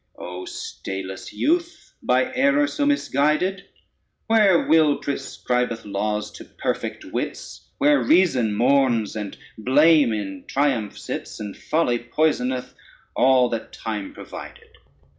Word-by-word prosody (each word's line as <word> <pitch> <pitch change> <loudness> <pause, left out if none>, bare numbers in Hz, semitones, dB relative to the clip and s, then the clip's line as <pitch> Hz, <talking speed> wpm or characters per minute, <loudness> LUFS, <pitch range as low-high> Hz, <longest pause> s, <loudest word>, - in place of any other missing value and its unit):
] - - -48
CORYDON 90 - -8
O - - -8
stayless 95 -1 -6
youth, 340 +3 -1
by 255 +1 +1
error 280 +3 +3
so 290 -1 -1
misguided, 180 - +1 0.6
Where 210 -6 +4
will 155 -3 +4
proscribeth 125 -4 -2
laws 105 +1 -2
to - - -11
perfect - - -4
wits, - - -6
Where 145 -2 +4
reason 125 - +3
mourns, 120 -2 +2
and 105 -2 -5 0.2
blame 145 +3 +5
in 95 -3 -4
triumph 135 -7 0
sits, - - -6
And 105 -2 -6
folly 150 -7 0
poisoneth 125 -1 -1 0.4
all 130 -1 +4
that 115 -1 -5
time 105 -3 -5
provided! - - -10
130 Hz, 125 wpm, -23 LUFS, 110-165 Hz, 0.6 s, blame